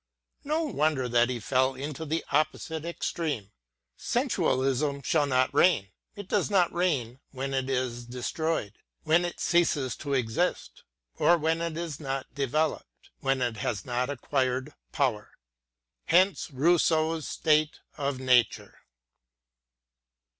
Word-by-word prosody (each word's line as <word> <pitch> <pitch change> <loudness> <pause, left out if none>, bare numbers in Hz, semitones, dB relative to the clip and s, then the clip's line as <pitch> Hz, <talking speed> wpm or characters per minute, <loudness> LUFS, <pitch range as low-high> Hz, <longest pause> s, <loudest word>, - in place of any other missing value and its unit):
No 310 +3 0
wonder 155 - 0
that 120 0 +3
he 125 -2 -2
fell 130 +4 +1
into 145 +4 -5
the 160 +2 -2
opposite 155 +2 -1
extreme. 155 - -3 0.4
Sensualism 135 +2 0
shall 150 0 +2
not 130 -1 +2
reign; 110 - +3
— - - -47
it 205 -3 -8
does - - +1
not 190 -4 +3
reign 135 -9 0
when 135 0 -4
it 135 0 -1
is 125 -2 -2
destroyed, 125 -1 -2 0.2
— - - -50
when 160 +3 +3
it 175 - -5
ceases 160 -7 +1
to 140 -2 -2
exist; 130 +8 -1 0.3
or 175 - +5
when 160 +1 0
it 165 -1 -3
is 165 -4 -4
not 135 -3 -4
developed, 145 +3 -2
— - - -51
when 135 -2 0
it 120 -3 -2
has 105 -2 -3
not 125 +1 -1
acquired 130 0 -1 0.2
power. 130 -9 -1 0.7
Hence 185 +3 +3
Rousseau 160 +2 +2
s 155 - -7
State 155 -1 +1 0.2
of 140 -2 -2
Nature. 125 -4 +2
140 Hz, 140 wpm, -28 LUFS, 130-160 Hz, 0.7 s, or